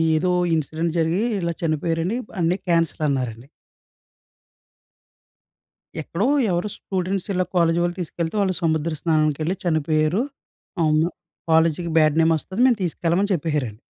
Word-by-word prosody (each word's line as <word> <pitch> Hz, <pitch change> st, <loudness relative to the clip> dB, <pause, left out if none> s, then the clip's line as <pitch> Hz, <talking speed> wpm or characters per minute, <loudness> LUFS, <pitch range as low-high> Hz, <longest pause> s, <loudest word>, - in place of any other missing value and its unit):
ఏదో 180 Hz, +3 st, +1 dB, 0.2 s
ఇన్సిడెంట్ 160 Hz, +2 st, -2 dB
జరిగి 165 Hz, +5 st, +1 dB, 0.2 s
ఇలా 170 Hz, -1 st, -1 dB
చనిపోయారండి 165 Hz, +6 st, 0 dB, 0.2 s
అన్ని 170 Hz, +2 st, +2 dB
క్యాన్సిల్ 165 Hz, -2 st, +1 dB
అన్నారండి. 125 Hz, -3 st, -3 dB, 2.6 s
ఎక్కడో 190 Hz, -, -2 dB, 0.2 s
ఎవరో 175 Hz, +4 st, 0 dB
స్టూడెంట్స్ 190 Hz, 0 st, -3 dB
ఇలా 185 Hz, -, +1 dB
కాలేజీ 170 Hz, 0 st, +3 dB
వాళ్ళు 175 Hz, +1 st, -1 dB
తీసుకెళ్తే 170 Hz, +2 st, -3 dB
వాళ్ళు 190 Hz, -2 st, +1 dB
సముద్ర 160 Hz, 0 st, 0 dB
స్నానానికెళ్ళి 155 Hz, +2 st, +1 dB
చనిపోయారు. 155 Hz, +3 st, +1 dB, 0.6 s
అవును. 155 Hz, +1 st, +3 dB, 0.4 s
కాలేజీకి 160 Hz, +1 st, +2 dB
బ్యాడ్ 155 Hz, -1 st, +4 dB
నేమ్ 165 Hz, 0 st, +4 dB
వస్తది 190 Hz, +8 st, -6 dB
మేము 245 Hz, -3 st, +4 dB
తీసుకెళ్ళమని 175 Hz, +3 st, 0 dB
చెప్పేసారండి. 145 Hz, -9 st, -2 dB
165 Hz, 115 wpm, -22 LUFS, 155-175 Hz, 2.6 s, బ్యాడ్